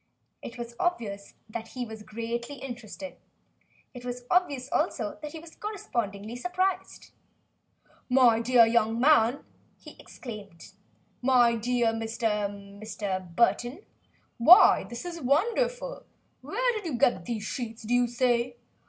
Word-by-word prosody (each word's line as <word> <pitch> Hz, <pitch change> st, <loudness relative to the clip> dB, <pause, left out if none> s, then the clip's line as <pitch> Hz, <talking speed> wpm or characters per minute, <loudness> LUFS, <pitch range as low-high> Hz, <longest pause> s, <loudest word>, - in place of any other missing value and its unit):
It 235 Hz, -, -8 dB
was 235 Hz, 0 st, -7 dB
obvious 220 Hz, -, -2 dB
that 225 Hz, +1 st, -6 dB
he 250 Hz, -, -2 dB
was 220 Hz, -1 st, -9 dB
greatly 235 Hz, +5 st, -5 dB
interested. 255 Hz, +1 st, -8 dB, 0.8 s
It 245 Hz, -2 st, -10 dB
was 245 Hz, 0 st, -5 dB
obvious, 285 Hz, -8 st, +2 dB
also, 265 Hz, -, -1 dB
that 300 Hz, -1 st, -7 dB
he -, -, -6 dB
was 320 Hz, 0 st, -13 dB
correspondingly 235 Hz, -, -4 dB
surprised. 370 Hz, +6 st, -2 dB, 1.0 s
"My 250 Hz, -3 st, +5 dB
dear 235 Hz, 0 st, +5 dB
young 225 Hz, 0 st, +2 dB
man," 255 Hz, -2 st, +4 dB, 0.3 s
he -, -, -13 dB
exclaimed, 205 Hz, -8 st, -10 dB, 0.5 s
"my 245 Hz, -2 st, +4 dB
dear 235 Hz, 0 st, +1 dB
Mr. 225 Hz, -2 st, -1 dB
Mr. 200 Hz, -3 st, -6 dB
Burton 240 Hz, -, +1 dB, 0.5 s
why, 345 Hz, -, +8 dB
this 235 Hz, +7 st, -8 dB
is 340 Hz, -2 st, -6 dB
wonderful! -, -, 0 dB, 0.4 s
Where -, -, 0 dB
did 420 Hz, -5 st, -4 dB
you 275 Hz, -7 st, -2 dB
get 185 Hz, -7 st, +2 dB
these 225 Hz, -3 st, -3 dB
sheets, 225 Hz, +2 st, -5 dB
do 225 Hz, +3 st, -2 dB
you 245 Hz, 0 st, +4 dB
say? 240 Hz, 0 st, +1 dB
240 Hz, 130 wpm, -28 LUFS, 225-280 Hz, 1.0 s, why